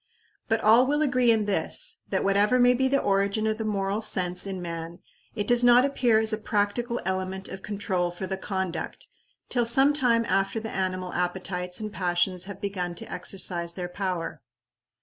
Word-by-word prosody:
But 225 0 +1
all 230 +4 +5
will 295 +2 +1
agree 255 -4 +2
in 220 -2 +3
this, 210 - 0
that - - 0
whatever 200 +5 +3
may 245 0 +5
be 265 +2 +1
the 275 +1 +2
origin 200 +2 +1
of 220 0 -1
the - - -2
moral 200 0 -1
sense 180 -2 0
in 190 -1 -4
man, 170 -1 -6 0.4
it 205 -2 -2
does 240 +2 +4
not 245 +1 +6
appear 250 -5 +2
as 220 0 +1
a 215 - -1
practical 220 +3 -1
element 190 0 -3
of 190 - -8
control 195 -4 -2
for 175 +2 -6
the 190 +1 -3
conduct 190 -4 -4 0.4
till 245 - +1
some 265 +5 +4
time 240 -5 +2
after 195 +3 0
the 220 0 -6
animal 185 -1 -3
appetites 180 +1 -2
and 215 -1 -5
passions 180 -1 0
have 200 -1 -8
begun 185 -4 -3
to - - -8
exercise 175 -2 0
their 180 0 -5
power. 175 -5 -4
200 Hz, 185 wpm, -26 LUFS, 185-230 Hz, 0.4 s, not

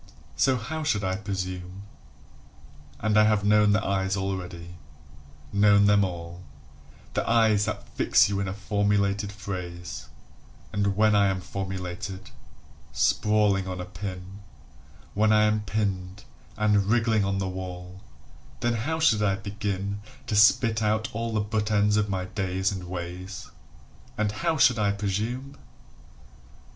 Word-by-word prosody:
So 130 0 +3
how 155 +7 -5
should 130 -10 0
I 95 0 0
presume? 95 -2 -5 1.2
And 110 0 +3
I 110 - +6
have 105 -1 +2
known 105 0 +4
the 105 +1 +1
eyes 95 0 0
already, 90 -3 -5 0.8
known 100 0 +5
them 100 0 +5
all 85 -1 -5 0.7
The - - -1
eyes 110 -3 +4
that 110 -2 -4
fix - - +3
you 100 0 -2
in 100 - -1
a 95 - -3
formulated 100 0 0
phrase, 90 -4 -6 0.7
And 100 -1 0
when 110 +1 +4
I 100 -1 +4
am 95 -1 0
formulated, 95 0 -6 0.6
sprawling 105 -3 +2
on 90 0 -4
a 90 - -4
pin, 95 0 -7 0.7
When 110 +1 +3
I 105 0 +5
am 105 0 +1
pinned 95 -2 -2 0.3
and 105 -2 +3
wriggling 110 -1 +2
on 100 0 0
the 95 -1 -1
wall, 90 0 -7 0.6
Then 120 0 +1
how 135 +9 -2
should 115 -10 +3
I 100 -2 +2
begin 100 0 -4 0.2
To 105 - -2
spit 110 +1 +4
out 110 +1 0
all 115 +1 -3
the 110 -1 0
butt 105 0 -1
ends 105 0 +3
of 105 -1 +1
my 95 -1 -2
days 95 -1 -1
and 95 -2 -5
ways? 90 +2 -7 0.7
And 105 -1 +1
how 160 +8 -1
should 130 -5 +4
I 100 -1 +2
presume? 110 +7 -3
100 Hz, 145 wpm, -26 LUFS, 95-105 Hz, 1.2 s, I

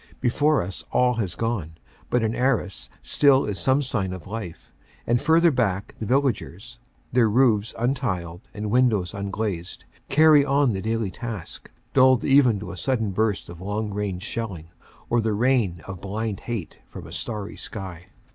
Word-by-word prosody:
Before 145 - +2
us 90 +2 -7
all 125 0 +3
has 95 -5 -3
gone, 105 -9 -2 0.3
but 125 -2 +2
in 110 0 0
Arras 125 -7 -1
still 140 -2 +4
is 100 -2 -2
some 135 +2 +2
sign 100 -8 -1
of 90 -4 -8
life, 100 -5 -7 0.3
and 120 0 +2
further 165 +2 +4
back 100 -7 -1
the 110 - -4
villagers, 120 -3 -1 0.3
their 120 -3 +4
roofs 110 -3 +2
untiled 100 -9 -2
and 105 0 -4
windows 110 -7 +2
unglazed, 100 -3 -4 0.2
carry 150 0 +6
on 140 -3 +2
the 95 - -3
daily 110 -2 -1
task, 110 -4 -7 0.2
dulled 130 -2 +5
even 135 -6 +4
to - - -6
a - - -8
sudden 115 -6 0
burst 105 0 0
of 85 0 -10
long 105 +2 -3
range 100 -3 -3
shelling 100 -8 -5 0.4
or 120 0 +2
the 110 -1 0
rain 110 -6 +1
of 95 -3 -8
blind 105 +1 -3
hate 115 -8 -5
from - - -10
a - - -11
starry 105 -2 -4
sky. 95 -3 -7
110 Hz, 165 wpm, -24 LUFS, 95-125 Hz, 0.4 s, carry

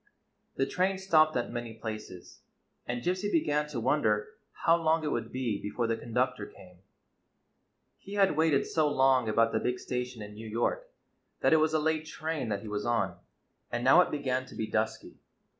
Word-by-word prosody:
The 135 - +1
train 185 +6 0
stopped 155 -6 +3
at 120 - -2
many 120 -2 -5
places, 110 -5 -8 0.5
and 120 0 -3
Gypsy 185 +3 -1
began 150 - +1
to 145 -5 -4
wonder 110 -4 +1 0.3
how 165 - +6
long 165 -1 +1
it 150 - -1
would 115 -1 -3
be 120 -6 -2
before 115 +3 -2
the 115 0 0
con 115 +1 -10
ductor 125 -3 0
came. 90 -2 -16 1.2
He 200 - -9
had 195 -5 +3
waited 155 -3 +3
so 155 -2 +1
long 130 -4 +3
about 115 +1 +3
the 110 - +1
big 125 +2 -1
station 125 -3 -4
in 105 0 -9
New 110 +2 -9
York 310 - -1 0.5
that - - +4
it - - +7
was 155 0 +2
a - - +3
late 155 0 0
train 155 -7 -3
that 100 0 -2
he - - -8
was 105 0 -3
on, 100 -7 0 0.5
and 120 0 -2
now 135 +8 +7
it - - +1
began 130 -3 -2
to - - -12
be 110 - -2
dusky. 110 0 -3
125 Hz, 190 wpm, -30 LUFS, 110-155 Hz, 1.2 s, it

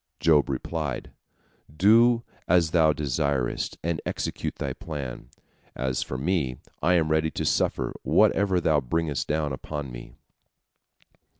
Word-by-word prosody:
Job 75 -3 +4
replied: 70 0 -3 0.7
"Do 115 +5 +5 0.2
as 85 -2 +3
thou 80 -3 +5
desirest, 70 -3 -1
and 85 -1 -1
execute - - -3
thy - - -3
plan. 70 -6 -7 0.5
As 65 -1 -1
for 65 - -4
me, 70 -4 -1 0.2
I 90 +4 +3
am 80 -2 +2
ready 80 0 +2
to - - -4
suffer - - 0
whatever 95 -2 +3
thou 80 -3 +3
bringest 75 +2 -1
down 75 -2 -1
upon 75 0 -5
me." - - -10
75 Hz, 125 wpm, -26 LUFS, 70-85 Hz, 0.7 s, Do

